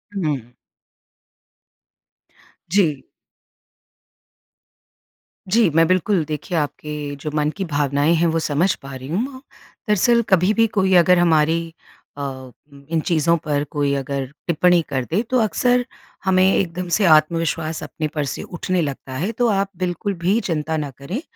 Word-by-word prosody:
हुँ। 145 - -2 2.2
जी। 160 -9 +2 2.4
जी, 215 0 +3
मैं 165 +2 +4
बिल्कुल 185 0 +2
देखिए 155 +3 -4
आपके 150 0 -4
जो 150 +2 -6
मन 150 0 +1
की 195 - -2
भावनाएँ 145 +1 +1
हैं 170 +1 +2
वो 165 0 +1
समझ 160 +5 +1
पा 135 -1 -10
रही 130 +1 -8
हूँ। 260 - -2 0.5
दरअसल 235 +4 +4
कभी 190 +2 +4
भी 225 0 +4
कोई 190 -3 +1
अगर 180 +1 +6
हमारी 165 0 +2 0.4
अ, 145 - -5 0.7
इन 165 -1 +1
चीज़ों 165 0 +2
पर 145 -2 0
कोई 145 -2 0
अगर 140 0 -3 0.2
टिप्पणी 175 +1 +3
कर 130 -2 -1
दे 195 +7 +2
तो 255 -1 +2
अक्सर 245 +3 +2 0.4
हमें 185 -1 +4
एकदम 180 -1 -1
से 210 - +2
आत्मविश्वास 160 0 +2
अपने 155 -2 -4
पर 150 -1 0
से - - -4
उठने 180 0 -2
लगता 135 -3 -5
है। 185 +10 -1
तो 240 +2 0
आप 195 -1 +1
बिल्कुल 185 +3 -2
भी 200 +6 +3
चिंता 160 -3 -2
ना 145 -2 -3
करें 175 - -5
165 Hz, 145 wpm, -21 LUFS, 150-190 Hz, 2.4 s, अगर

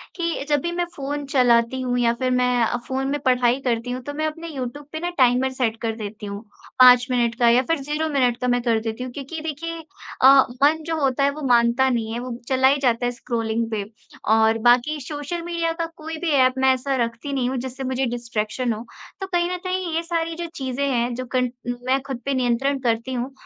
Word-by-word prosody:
कि 335 -5 -2
जब 290 -2 +2
भी 345 - -2
मैं 350 0 -1
फ़ोन 285 +1 -4
चलाती 245 -1 +3
हूँ 250 -1 -1
या 235 -1 +3
फिर 255 0 +1
मैं 250 -1 +2
अ, 230 - 0
फ़ोन 265 0 -2
में 290 +1 -1
पढ़ाई 250 0 +3
करती 240 0 -1
हूँ, 250 +1 -4
तो 290 +3 -6
मैं 310 +1 -1
अपने 325 +2 -6
यूट्यूब 265 +2 -5
पे 315 - -4
ना 350 - -2
टाइमर 255 0 +4
सेट 235 -4 -1
कर 225 -1 -2
देती 215 -1 -7
हूँ, 200 0 -6 0.4
5 250 -1 +8
मिनट 240 -2 +1
का 235 -1 +5
या 240 +2 +5
फिर 330 - +1
0 300 +3 -2
मिनट 250 -5 +2
का 250 - 0
मैं 245 0 +2
कर 230 -2 +2
देती 225 +2 -4
हूँ 255 - -6
क्योंकि 285 +5 -6
देखिए 325 +2 -5 0.4
अ, 270 +1 +8 0.2
मन 315 +3 +4
जो 325 0 -1
होता 270 0 +1
है, 280 - +4
वो 300 +2 -8
मानता 240 +2 +4
नहीं 225 -3 -1
है, 235 - -3
वो 245 -1 -5
चला 260 0 +3
ही 275 +2 +4
जाता 245 -2 +1
है 245 - +1
स्क्रॉलिंग 230 -2 -2
पे। 210 -2 -1 0.5
और 225 0 +3
बाकी 255 +5 +3
सोशल 290 +5 -5
मीडिया 335 -1 -1
का - - 0
कोई 320 +1 -6
भी 325 - +1
ऐप 260 -2 +4
मैं 265 0 +4
ऐसा 265 +1 -2
रखती 235 +5 -5
नहीं 255 -2 0
हूँ 265 - -2
जिससे 260 +1 -5
मुझे 260 0 -1 0.2
डिस्ट्रैक्शन 230 +1 -2
हो। 220 +2 -7 0.4
तो 385 - -3
कहीं 350 -1 0
न 365 - -2
कहीं 370 -2 -2
ये 330 - +1
सारी 330 -1 -2
जो 340 +1 -4
चीज़ें 265 -1 -2
हैं, 240 -1 0
जो 255 +1 -5
कन 250 -1 +2 0.4
मैं 265 +1 +2
खुद 265 -3 -3
पे 275 - 0
नियंत्रण 260 +2 +1
करती 235 0 -1
हूँ, 250 +2 -3
255 Hz, 235 wpm, -22 LUFS, 240-290 Hz, 0.5 s, 5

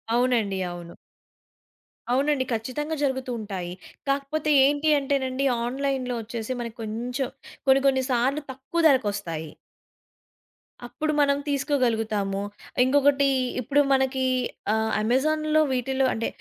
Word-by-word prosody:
అవునండి. 240 -5 +1
అవును. 175 -1 -9 1.2
అవునండి. 275 0 +2
ఖచ్చితంగా 260 +8 -3
జరుగుతూ 265 -2 -1
ఉంటాయి. 190 -5 -5 0.4
కాకపోతే 285 +2 0
ఏంటి 290 +2 +2
అంటేనండి 270 -1 -1 0.2
ఆన్‌లైన్‌లో 255 -1 -2
ఒచ్చేసి 230 +2 -4
మనకి 235 0 -6
కొంచెం 245 +4 -3 0.4
కొన్ని 270 0 +6
కొన్ని 265 -1 +2
సార్లు 265 +5 +1
తక్కువ 270 +6 -3
ధరకొస్తాయి. 200 - -1 1.4
అప్పుడు 305 +5 -2
మనం 280 -1 +3
తీసుకోగలుగుతాము. 225 -8 0 0.4
ఇంగొకటి 280 +1 +3 0.3
ఇప్పుడు 285 +4 +2
మనకి 265 0 +1 0.5
ఆహ్, 220 0 0
అమెజాన్‌లో 310 +7 +2
వీటిల్లో 265 +1 0
అంటే, 225 - -2
260 Hz, 100 wpm, -25 LUFS, 230-280 Hz, 1.4 s, కొన్ని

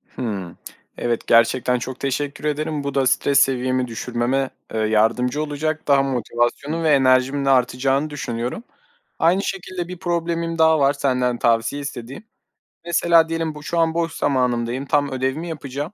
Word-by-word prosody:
Hımm, 100 -8 -5 0.4
evet, 120 -1 -2
gerçekten 120 +2 +3
çok 130 +1 -6
teşekkür 140 +2 -3
ederim. 150 0 -2
Bu 140 -1 -4
da 135 -2 +3
stres 135 +2 +3
seviyemi 130 -1 +1
düşürmeme, 125 +3 -1 0.2
ııı, 110 -1 0
yardımcı 120 +6 +1
olacak. 155 +1 -3
Daha 140 -1 +4
motivasyonum 130 +4 -1
ve 160 - +2
enerjimin 135 0 +3
de 135 - +2
artacağını 135 +3 +2
düşünüyorum. 125 - -4 0.6
Aynı 180 +4 +3
şekilde 185 -2 -4
1 180 -1 -7
problemim 170 -2 -2
daha 160 -1 +4
var 140 0 +3
senden 125 -3 0
tavsiye 115 +4 +1
istediğim. 135 - -7 0.6
Mesela 170 -1 +3
diyelim 165 -1 -2
bu, 150 - -10
şu 170 +3 -2
an 165 -1 +2
boş 165 0 -1
zamanımdayım, 125 -3 0
tam 145 0 +1
ödevimi 135 +6 -2
yapacağım. 145 +2 -5
140 Hz, 150 wpm, -21 LUFS, 125-155 Hz, 0.6 s, Daha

